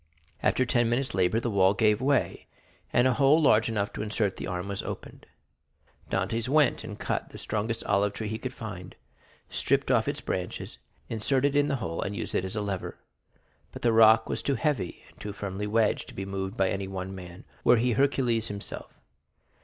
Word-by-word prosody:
After 130 Hz, -, +2 dB
ten 120 Hz, -1 st, +2 dB
minutes' 130 Hz, +3 st, 0 dB
labor 95 Hz, +3 st, +2 dB
the 120 Hz, 0 st, -2 dB
wall 95 Hz, 0 st, +4 dB
gave 105 Hz, +1 st, +3 dB
way, 140 Hz, +1 st, 0 dB, 0.4 s
and 120 Hz, +1 st, +4 dB
a 130 Hz, -, +3 dB
hole 140 Hz, +5 st, +5 dB
large 115 Hz, -7 st, +4 dB
enough 105 Hz, -2 st, -1 dB
to -, -, -4 dB
insert 105 Hz, -2 st, 0 dB
the -, -, -5 dB
arm 90 Hz, +1 st, -3 dB
was 100 Hz, -1 st, -3 dB
opened. -, -, -8 dB, 0.8 s
Dantès 110 Hz, +6 st, -1 dB
went 145 Hz, -2 st, +3 dB
and 105 Hz, -2 st, -7 dB
cut -, -, -2 dB
the -, -, -10 dB
strongest 110 Hz, +1 st, -2 dB
olive 100 Hz, 0 st, +1 dB
tree 110 Hz, -, -4 dB
he 110 Hz, +1 st, -3 dB
could 130 Hz, +1 st, -4 dB
find, 90 Hz, -5 st, -8 dB, 0.5 s
stripped -, -, 0 dB
off -, -, +3 dB
its -, -, -2 dB
branches, -, -, -4 dB, 0.3 s
inserted 135 Hz, +5 st, +1 dB
it -, -, +5 dB
in 145 Hz, -, +2 dB
the 140 Hz, -, 0 dB
hole, 85 Hz, -10 st, -3 dB
and 100 Hz, +1 st, -3 dB
used -, -, -4 dB
it 90 Hz, -, 0 dB
as 95 Hz, -, -5 dB
a 105 Hz, -, -1 dB
lever. 100 Hz, -3 st, -4 dB, 0.7 s
But -, -, -10 dB
the 120 Hz, -1 st, +3 dB
rock 110 Hz, 0 st, +6 dB
was -, -, -3 dB
too 140 Hz, -, 0 dB
heavy, 140 Hz, -, -1 dB
and -, -, -21 dB
too 105 Hz, -1 st, -5 dB
firmly 100 Hz, 0 st, -4 dB
wedged, 110 Hz, 0 st, +1 dB
to -, -, -12 dB
be 95 Hz, -, -4 dB
moved 95 Hz, +2 st, -4 dB
by 95 Hz, -1 st, +3 dB
anyone 95 Hz, -1 st, -4 dB
man, 90 Hz, +2 st, -10 dB, 0.2 s
were 120 Hz, -, +6 dB
he 120 Hz, +2 st, +2 dB
Hercules 120 Hz, -3 st, +2 dB
himself. 100 Hz, -2 st, -7 dB
110 Hz, 200 wpm, -28 LUFS, 100-120 Hz, 0.8 s, rock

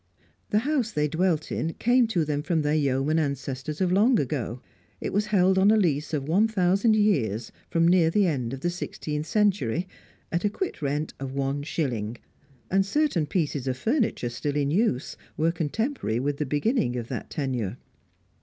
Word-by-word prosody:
The 210 Hz, -, +2 dB
house 280 Hz, -7 st, +1 dB
they 150 Hz, -3 st, +1 dB
dwelt 165 Hz, 0 st, 0 dB
in 165 Hz, -, -2 dB
came 245 Hz, 0 st, +3 dB
to 175 Hz, -8 st, 0 dB
them 145 Hz, -1 st, -1 dB
from 165 Hz, -1 st, 0 dB
their 150 Hz, 0 st, +1 dB
yeoman 145 Hz, +1 st, +1 dB
ancestors 140 Hz, 0 st, -3 dB
of 180 Hz, -1 st, +2 dB
long 215 Hz, +5 st, +4 dB
ago; 125 Hz, -3 st, -2 dB, 0.4 s
it -, -, -4 dB
was 205 Hz, +2 st, +1 dB
held 190 Hz, -2 st, +3 dB
on 195 Hz, +2 st, +5 dB
a 220 Hz, -, +5 dB
lease 155 Hz, -7 st, +1 dB
of 145 Hz, -3 st, -2 dB
one 195 Hz, +8 st, +3 dB
thousand 200 Hz, +1 st, +2 dB
years 130 Hz, -, +1 dB, 0.2 s
from 165 Hz, 0 st, +3 dB
near 170 Hz, -2 st, +5 dB
the 200 Hz, +4 st, +3 dB
end 130 Hz, -9 st, -1 dB
of 135 Hz, 0 st, -6 dB
the 175 Hz, -, 0 dB
sixteenth 155 Hz, -3 st, -4 dB
century, 185 Hz, -, +1 dB, 0.4 s
"at 170 Hz, 0 st, -1 dB
a 205 Hz, -, +3 dB
quit 355 Hz, -, -4 dB
rent 145 Hz, +2 st, -2 dB
of 135 Hz, -1 st, -5 dB
one 140 Hz, +1 st, -1 dB
shilling," 120 Hz, -7 st, -2 dB, 0.5 s
and 195 Hz, +1 st, +4 dB
certain 200 Hz, -, +1 dB
pieces 145 Hz, -6 st, -1 dB
of 130 Hz, -1 st, -1 dB
furniture 225 Hz, -, 0 dB
still 140 Hz, +4 st, -3 dB
in 145 Hz, -1 st, +1 dB
use 175 Hz, -, 0 dB, 0.2 s
were 165 Hz, +2 st, +2 dB
contemporary 165 Hz, -, -2 dB
with 140 Hz, +2 st, -1 dB
the 150 Hz, -, -2 dB
beginning 145 Hz, -, +1 dB
of 120 Hz, -2 st, -4 dB
the 125 Hz, -3 st, -4 dB
tenure. 125 Hz, -7 st, -2 dB
155 Hz, 180 wpm, -26 LUFS, 140-195 Hz, 0.5 s, on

